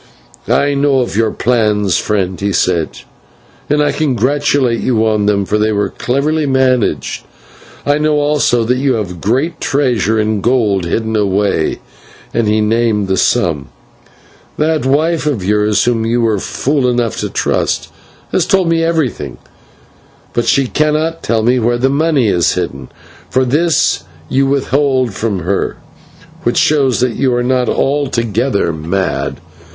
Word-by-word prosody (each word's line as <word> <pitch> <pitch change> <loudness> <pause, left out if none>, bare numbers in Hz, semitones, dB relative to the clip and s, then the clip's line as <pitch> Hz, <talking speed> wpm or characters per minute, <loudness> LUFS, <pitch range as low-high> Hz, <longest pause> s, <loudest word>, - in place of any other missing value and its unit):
"I 145 0 +2
know 140 0 +1
all 130 -2 +1
your 110 +2 +1
plans, 105 -5 +1
friend," 95 -3 -2
he 100 0 -1
said, 85 -4 0 0.7
"and 150 0 +2
I 145 - +1
congratulate 135 -2 +1
you 110 -3 +1
on 105 -2 +1
them, 100 -1 +1
for 105 +2 0
they 110 +1 +1
were 100 -2 0
cleverly 145 +4 -1
managed. 130 -3 0 0.6
I 145 +1 +2
know 155 0 +1
also 145 -5 +2
that 125 +3 0
you 135 -1 +1
have 105 -5 -3
a - - -6
great 125 - -1
treasure 120 -6 +1
in 105 -1 0
gold 105 -7 +1
hidden 110 +6 -2
away 100 -5 0 0.3
" - - -24
and 115 -2 +1
he 110 +1 +2
named 110 -2 +1
the 95 - +2
sum. 85 - +1 0.9
"That 155 -2 0
wife 155 +3 +1
of 125 -11 -1
yours, 105 0 +2
whom 120 -2 +1
you 120 +1 +1
were 110 -3 +1
fool 135 +5 0
enough 120 -2 -1
to - - -3
trust, - - -1 0.4
has 180 -1 +1
told 190 -3 +2
me 165 0 +2
everything, 160 -6 -1 1.0
but 120 - 0
she 140 - +3
cannot 155 +4 0
tell 115 -1 0
me 125 +2 +2
where 120 +1 +1
the 130 +2 +1
money 145 -3 +1
is 90 -4 +2
hidden, - - -4 0.4
for 130 0 +1
this 155 +6 +1 0.3
you 135 +1 +2
withheld 135 -3 +1
from 100 -3 -2
her, 95 +4 -2 0.6
which - - -1
shows 135 -5 +2
that 125 -2 0
you 130 -3 +1
are 120 - 0
not 125 -1 +1
altogether 120 - 0
mad. 85 +5 -2
120 Hz, 155 wpm, -14 LUFS, 105-140 Hz, 1.0 s, she